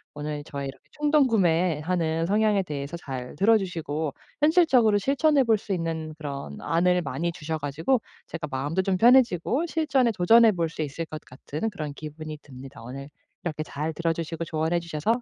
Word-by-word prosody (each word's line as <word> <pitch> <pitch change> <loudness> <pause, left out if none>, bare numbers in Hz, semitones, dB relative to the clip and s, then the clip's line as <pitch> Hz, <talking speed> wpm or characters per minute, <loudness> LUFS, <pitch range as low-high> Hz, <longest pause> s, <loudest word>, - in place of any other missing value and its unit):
오늘 150 0 -4
저의 140 -1 -5
이렇게 135 - -12
충동 295 -2 +3
구매하는 165 - +1
성향에 210 +1 +2
대해서 150 0 -5
잘 130 -5 -7
들어주시고 175 -8 +1 0.3
현실적으로 290 - +5
실천해 280 +5 +3
볼 225 -3 +3
수 205 - -8
있는 165 -3 -2
그런 140 - -6
안을 180 +3 +2
많이 170 +4 -2
주셔 160 -1 -4
가지고 160 - 0 0.2
제가 165 -2 -5
마음도 145 +7 -1
좀 185 -1 0
편해지고 245 - +4
실전에 275 -7 +2
도전해 225 +4 +6
볼 170 -4 -1
수 160 - -6
있을 155 +2 -3
것 155 -1 -8
같은 150 - -5
그런 155 -8 -5
기분이 155 +1 -7
듭니다. 130 -2 -12
오늘 135 +4 -8 0.4
이렇게 155 -2 -3
잘 155 +1 -4
들어주시고 165 0 -2
조언해 160 +2 0
주셔서 170 +9 -1
165 Hz, 380 characters per minute, -26 LUFS, 150-215 Hz, 0.4 s, 도전해